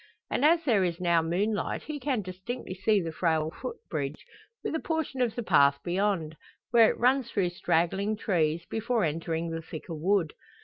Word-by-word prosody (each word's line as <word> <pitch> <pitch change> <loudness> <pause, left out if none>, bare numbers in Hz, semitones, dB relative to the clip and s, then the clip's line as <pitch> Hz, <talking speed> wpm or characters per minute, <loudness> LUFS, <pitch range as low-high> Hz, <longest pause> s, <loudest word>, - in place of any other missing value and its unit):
And - - 0
as 330 +2 +5
there 220 - +3
is 170 -1 -1
now 170 -2 +3
moonlight 200 +6 -1
he 305 -1 -5
can 260 -6 -1
distinctly 185 +4 -6
see 200 +3 +2
the 165 - -3
frail 160 -1 0
footbridge, 155 - -5 0.4
with - - -2
a 320 - 0
portion 320 -6 -2
of 235 -3 +1
the 240 - -3
path 140 -8 +5
beyond, 175 -3 0 0.4
where 230 -2 +7
it - - -2
runs 255 0 +2
through 195 -6 +1
straggling 190 +4 0
trees, 170 -5 0
before 225 0 -1
entering 165 +1 -2
the 165 0 -3
thicker 165 +1 -8
wood. 170 0 +1
185 Hz, 175 wpm, -28 LUFS, 165-230 Hz, 0.4 s, where